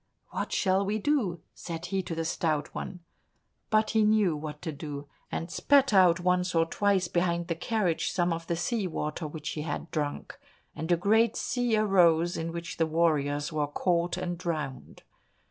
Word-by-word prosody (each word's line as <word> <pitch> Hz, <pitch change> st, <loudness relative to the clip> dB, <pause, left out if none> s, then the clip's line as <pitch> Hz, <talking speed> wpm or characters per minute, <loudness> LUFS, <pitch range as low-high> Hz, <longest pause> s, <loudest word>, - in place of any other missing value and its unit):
"What -, -, -3 dB
shall 190 Hz, 0 st, +2 dB
we 205 Hz, +2 st, -1 dB
do?" 215 Hz, -, 0 dB
said 170 Hz, 0 st, -6 dB
he 195 Hz, +1 st, -1 dB
to 170 Hz, -2 st, -5 dB
the 165 Hz, 0 st, -2 dB
Stout 155 Hz, -2 st, -1 dB
One. 180 Hz, -2 st, -6 dB, 0.7 s
But 215 Hz, 0 st, +2 dB
he 220 Hz, -, +3 dB
knew 210 Hz, -6 st, +3 dB
what 150 Hz, 0 st, -6 dB
to 165 Hz, -, -2 dB
do, 145 Hz, -1 st, -7 dB, 0.2 s
and 170 Hz, +1 st, -4 dB
spat 275 Hz, +1 st, +3 dB
out 185 Hz, -3 st, +6 dB
once 180 Hz, 0 st, +1 dB
or 165 Hz, 0 st, +4 dB
twice 195 Hz, +1 st, +1 dB
behind 170 Hz, 0 st, 0 dB
the -, -, +2 dB
carriage 180 Hz, -1 st, 0 dB
some 175 Hz, -2 st, +1 dB
of 165 Hz, 0 st, -6 dB
the 170 Hz, -, 0 dB
sea 190 Hz, +4 st, -1 dB
water 155 Hz, -1 st, -3 dB
which 150 Hz, 0 st, -6 dB
he 150 Hz, -, -4 dB
had 155 Hz, +2 st, -4 dB
drunk, 150 Hz, -3 st, -3 dB, 0.4 s
and 160 Hz, +3 st, -3 dB
a 175 Hz, -, +5 dB
great 220 Hz, +5 st, +3 dB
sea 240 Hz, -2 st, 0 dB
arose 175 Hz, -5 st, +4 dB
in 165 Hz, +1 st, -3 dB
which 170 Hz, 0 st, -6 dB
the 165 Hz, -, +2 dB
warriors 155 Hz, -2 st, +1 dB
were 150 Hz, -1 st, 0 dB
caught 170 Hz, +3 st, 0 dB
and 175 Hz, -2 st, -3 dB
drowned. 150 Hz, -7 st, -5 dB
170 Hz, 180 wpm, -28 LUFS, 160-195 Hz, 0.7 s, out